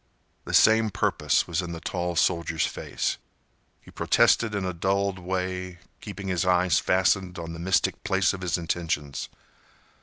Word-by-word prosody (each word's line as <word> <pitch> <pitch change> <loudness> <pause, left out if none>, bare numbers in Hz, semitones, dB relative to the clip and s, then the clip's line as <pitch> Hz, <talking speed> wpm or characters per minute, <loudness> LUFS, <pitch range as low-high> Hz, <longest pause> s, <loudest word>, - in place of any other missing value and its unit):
The - - -6
same 110 0 +5
purpose - - +1
was 85 0 -1
in 85 -1 -6
the 85 - -6
tall 90 0 -3
soldier's 85 -2 +1
face. - - -3 0.6
He - - -16
protested 110 -3 +2
in 100 -2 -2
a 90 - -2
dulled 95 +2 0
way, 90 0 -3 0.2
keeping 95 +1 -7
his 90 -3 0
eyes 90 -1 +3
fastened 95 0 +1
on 85 0 -6
the 80 - -8
mystic 90 +1 0
place 95 -1 +2
of 95 - -7
his 90 -1 0
intentions. 80 -4 -3
90 Hz, 155 wpm, -26 LUFS, 85-95 Hz, 0.6 s, same